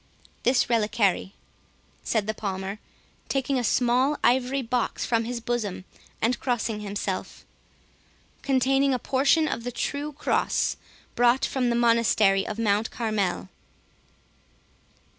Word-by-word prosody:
"This 250 +1 +2
reliquary," 210 -4 +1 0.7
said 220 -3 0
the 220 - -1
Palmer, 195 -1 -4 0.5
taking 270 -1 0
a - - -2
small 250 +5 +2
ivory 260 +2 +2
box 245 0 -1
from 230 -1 +1
his 240 0 -3
bosom, 220 -6 -3 0.4
and 240 +2 +1
crossing 240 -4 -1
himself, 200 -2 -4 1.0
"containing 270 0 +2
a - - +1
portion 275 +6 +2
of 230 - -3
the 245 - -4
true 285 +5 -3
cross, 290 - 0 0.4
brought 245 +2 +3
from 255 -2 0
the 235 - +1
Monastery 230 -4 +3
of 215 - -4
Mount 215 -1 +1
Carmel." 200 - -2
235 Hz, 120 wpm, -26 LUFS, 210-255 Hz, 1.0 s, brought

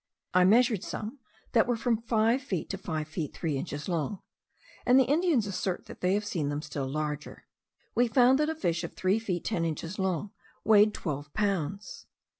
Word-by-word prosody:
I 180 0 +5
measured 225 0 +4
some 225 +6 -5 0.3
that 225 -1 +4
were 245 - +2
from 230 -1 0
five 230 +2 +2
feet 190 - -3
to 195 - -3
five 155 -5 -3
feet 155 -1 -5
three 160 -4 -2
inches 145 +2 -4
long; 175 +2 -2 0.6
and 250 +2 +6
the - - +6
Indians 300 - +2
assert 185 -2 -3
that - - -11
they 185 +2 +2
have 210 +1 -1
seen 165 -8 -2
them 145 +1 -3
still 145 -3 -4
larger. 150 0 -4 0.5
We 245 +1 +3
found 250 +3 +5
that 300 +1 +2
a 320 - -2
fish 175 - -1
of 170 - -5
three 190 +4 +1
feet 185 -6 -3
ten 180 -7 0
inches 165 +4 -3
long 190 +1 -1 0.3
weighed 210 -1 +5
twelve 145 -2 -4
pounds. 200 -2 -2
195 Hz, 190 wpm, -29 LUFS, 160-230 Hz, 0.6 s, and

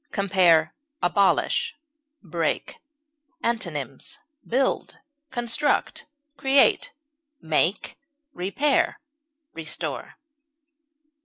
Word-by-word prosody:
Compare 180 -5 +3 0.3
ABOLISH; 200 - +2 0.5
BREAK. 165 -3 -2 0.7
Antonyms: 155 - -3 0.3
build, 260 +3 0 0.3
construct, 240 +6 0 0.3
create, 275 - +4 0.5
make, 165 +4 0 0.3
repair, 265 +11 +1 0.5
restore. 160 -2 -5
195 Hz, 55 wpm, -25 LUFS, 165-260 Hz, 0.7 s, create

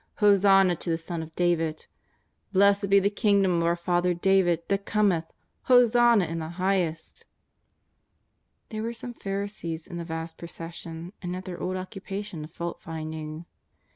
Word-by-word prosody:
Ho 205 -2 +6
sanna 195 -2 +5
to 170 - -5
the 165 - +1
Son 165 0 -5
of 160 0 -10
David! 165 -3 0 0.7
Blessed 200 +1 +4
be 200 0 +6
the 200 +1 +1
Kingdom 200 -4 +3
of 170 - +1
our 170 - +2
father 175 0 +1
David 175 -2 +2
that 200 0 0
cometh, 200 -6 +1 0.4
Hosanna 240 -4 +5
in 165 0 -4
the 160 0 -5
highest 180 -2 -1
V' - - -18 1.4
There 215 -1 -4
were 230 +1 -3
some 240 +1 -7
Pharisees 195 -6 -4
in 175 - -7
the 170 - -4
vast 165 0 -6
procession, 170 +1 -8
and 180 0 -4
at 185 0 -7
their 180 -2 -6
old 185 - -2
occupation 195 -2 -6
of 155 - -10
faultfinding. 160 -2 -6
180 Hz, 160 wpm, -27 LUFS, 165-200 Hz, 1.4 s, Ho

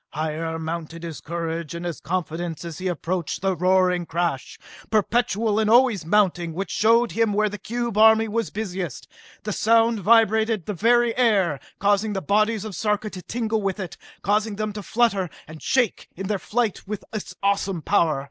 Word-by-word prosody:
Higher 160 +2 -3
mounted 165 0 -5
his 165 -3 -6
courage 165 -1 -4
and 170 +1 -5
his 170 -2 -4
confidence 170 -1 -3
as 165 -2 -7
he 185 - -3
approached 175 -1 -2
the 190 -1 +1
roaring 180 -1 +2
crash, 165 -6 -2 0.3
perpetual 220 0 +1
and 215 -1 +1
always 230 -8 +4
mounting, 175 -4 +2
which 195 +4 -4
showed 230 +2 +3
him 225 -2 +1
where 215 +1 +2
the 205 0 -7
cube 235 +1 -3
army 220 0 +6
was 225 +1 -1
busiest. 185 - -5 0.4
The 210 - -3
sound 230 +1 +3
vibrated 220 -1 +3
the 210 - -3
very 235 +4 +3
air, 200 - +2 0.2
causing 205 +1 +1
the 195 - -1
bodies 215 +5 +1
of 215 - -6
Sarka 210 +2 -1
to 185 - -8
tingle 220 +1 -2
with 195 0 -2
it, 185 -4 -5 0.3
causing 210 +2 +1
them 215 0 -3
to 210 - -6
flutter 200 -4 +1 0.2
and 155 0 -11
shake 250 -6 0
in 195 - -5
their 200 0 -1
flight 225 -3 -2
with 210 -1 -5
its 215 - -5
awesome 195 -4 0
power. 165 -8 +2
200 Hz, 175 wpm, -23 LUFS, 170-220 Hz, 0.4 s, army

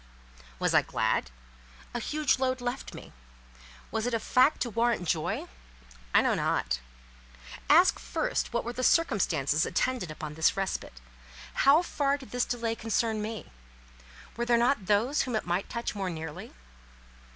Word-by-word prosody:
Was - - 0
I - - +6
glad? - - 0 0.6
A - - -2
huge 300 -3 0
load 260 -1 0
left 245 +2 -4
me. - - -11 0.8
Was 225 +1 -1
it 245 - 0
a - - 0
fact 255 +6 +3
to 240 - -1
warrant 230 -4 +1
joy? 155 -1 -1 0.7
I - - +5
know - - +2
not. - - 0 0.9
Ask 345 +5 +6
first - - -2
what 235 - -1
were 240 - -4
the 255 - -4
circumstances 165 - +2
attendant 185 -12 -1
on 150 -1 -4
this 160 +4 +2
respite? 190 - -3 0.5
How 290 +5 +5
far 285 -4 0
did 265 -3 -13
this 245 0 0
delay 235 -2 -2
concern 225 -1 -1
me? 220 +1 -6 0.9
Were 235 - -1
there 240 0 +4
not 235 -4 +1
those 225 +8 +2
whom 250 -3 -2
it 220 - -1
might 175 +2 -1
touch 235 0 -3
more 195 -3 -3
nearly? 160 -2 -7
235 Hz, 155 wpm, -29 LUFS, 190-255 Hz, 0.9 s, I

